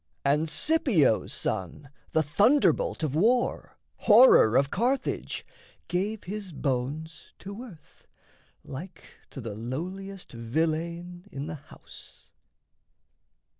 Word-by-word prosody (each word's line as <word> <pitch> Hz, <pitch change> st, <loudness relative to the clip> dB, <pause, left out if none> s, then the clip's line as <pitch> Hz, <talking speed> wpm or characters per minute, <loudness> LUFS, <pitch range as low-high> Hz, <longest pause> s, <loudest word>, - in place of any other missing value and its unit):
And 150 Hz, +3 st, +2 dB
Scipio's 235 Hz, -, +2 dB
son, 95 Hz, -, -4 dB, 0.2 s
the 160 Hz, -, +2 dB
thunderbolt 260 Hz, -, +2 dB
of 150 Hz, -4 st, -1 dB
war, 230 Hz, +10 st, +1 dB, 0.2 s
Horror 210 Hz, -, +7 dB
of 140 Hz, 0 st, +2 dB
Carthage, 250 Hz, +6 st, -1 dB, 0.4 s
gave 200 Hz, +4 st, -2 dB
his 200 Hz, 0 st, -6 dB
bones 145 Hz, +3 st, -4 dB
to 200 Hz, +4 st, -8 dB
earth, 185 Hz, -12 st, -14 dB, 0.6 s
Like 175 Hz, +8 st, -9 dB, 0.3 s
to -, -, -9 dB
the 115 Hz, -4 st, -5 dB
lowliest 180 Hz, -, -6 dB
villein 165 Hz, -, -3 dB
in 140 Hz, -2 st, -5 dB
the 160 Hz, -, -5 dB
house. 145 Hz, -2 st, -14 dB
165 Hz, 100 wpm, -27 LUFS, 140-205 Hz, 0.6 s, Horror